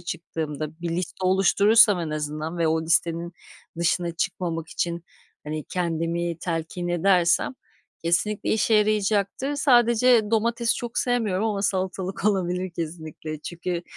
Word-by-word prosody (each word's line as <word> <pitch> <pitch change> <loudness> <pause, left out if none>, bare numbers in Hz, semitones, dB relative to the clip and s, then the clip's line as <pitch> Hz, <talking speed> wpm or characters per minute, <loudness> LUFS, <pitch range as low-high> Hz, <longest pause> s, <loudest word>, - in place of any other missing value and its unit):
çıktığımda, 160 -2 -5
bir 175 - -3
liste 180 +2 -3
oluşturursam 200 +2 +5
en 165 -2 -3
azından 155 +2 -4
ve 165 -1 +2
o 160 0 +1
listenin 170 +1 0 0.5
dışına 170 0 +1
çıkmamak 165 -2 -2
için, 170 0 -3 0.4
hani, 155 0 -4
kendimi 170 -1 -2
telkin 170 +1 -3
edersem 175 +4 +2 0.5
kesinlikle 180 +5 0
işe 220 0 +2
yarayacaktır. 210 +5 +1
Sadece 240 -3 +4
domatesi 230 +1 +1
çok 240 -1 -4
sevmiyorum 220 -6 0
ama 205 -2 -1
salatalık 190 0 -2
olabilir 185 -2 0
kesinlikle. 160 -2 -6
Çünkü, 175 +1 -4
175 Hz, 120 wpm, -24 LUFS, 165-210 Hz, 0.5 s, oluşturursam